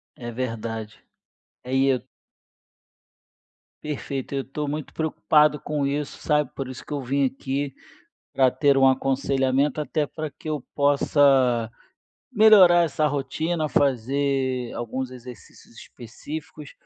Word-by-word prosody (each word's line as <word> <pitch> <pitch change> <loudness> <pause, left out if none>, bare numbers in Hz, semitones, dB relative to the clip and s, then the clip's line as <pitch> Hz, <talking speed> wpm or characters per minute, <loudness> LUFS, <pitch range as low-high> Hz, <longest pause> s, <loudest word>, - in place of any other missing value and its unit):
É 120 -1 -7
verdade. 115 -2 -5 0.6
É 125 - -7
e 135 +1 +3
eu 130 -2 +2 1.8
Perfeito, 140 -2 -5
eu 135 - 0
estou 145 +2 -5
muito 150 0 -5
preocupado 150 -1 +2
com 145 -2 -2
isso, 145 +1 -3
sabe? 150 -3 +1
Por 135 -2 -5
isso 130 - -9
que - - -14
eu 145 -2 -2
vim 135 +2 0
aqui 135 +1 -3 0.6
para 130 -1 +4
ter 140 +1 +2
um 135 - +5
aconselhamento, 135 +2 +1
até 150 0 -1
para 155 0 -6
que 155 - -11
eu 150 -2 -2
possa 135 -5 +3 0.6
melhorar 200 -7 +7
essa 155 0 -1
rotina, 155 +3 -2
fazer 130 -1 0
alguns 125 +2 -4
exercícios 125 -3 -13
específicos, 145 +5 -9
140 Hz, 125 wpm, -24 LUFS, 130-150 Hz, 1.8 s, melhorar